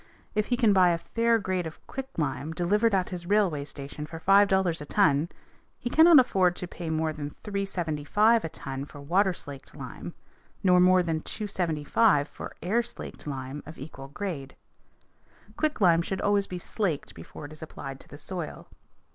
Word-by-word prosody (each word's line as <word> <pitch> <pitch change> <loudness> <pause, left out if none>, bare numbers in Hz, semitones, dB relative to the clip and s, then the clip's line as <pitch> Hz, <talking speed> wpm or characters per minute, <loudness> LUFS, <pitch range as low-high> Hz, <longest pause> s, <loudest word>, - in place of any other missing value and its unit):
If 215 0 0
he 245 - +1
can 225 -5 +4
buy 185 -2 +6
a 170 - +2
fair 230 +7 +1
grade 185 -4 -2
of 160 - -10
quicklime 160 - -4
delivered 205 +6 +2
at 185 -1 0
his 175 -2 -6
railway 195 -8 +2
station 145 +1 -7
for 165 +1 -8
$5.00 190 -3 +4
a - - -6
ton, 155 -3 +3 0.5
he 240 - -4
cannot 325 0 +8
afford 185 -8 +3
to 180 - -5
pay 175 -1 -6
more 160 0 0
than 145 -1 -6
$3.75 200 +2 +1
a 165 - -3
ton 135 -2 -6
for 145 - -12
water 185 +7 +2
slaked 140 -6 -10
lime, - - -8 0.5
nor 180 -2 +5
more 180 0 +5
than 160 -2 -1
$2.75 180 -3 +1
for - - -9
air 215 +7 +2
slaked 235 -8 -9
lime 135 0 -5
of 155 - -9
equal 135 -1 -9
grade. 145 -4 -5 1.0
Quicklime 190 - +3
should 190 +2 -3
always 205 -1 +2
be 180 - -5
slaked 175 -4 -2
before 85 - -10
it 145 - -10
is 155 - -12
applied 135 -3 -7
to - - -15
the 145 - -11
soil. 175 +1 -6
175 Hz, 170 wpm, -27 LUFS, 150-200 Hz, 1.0 s, cannot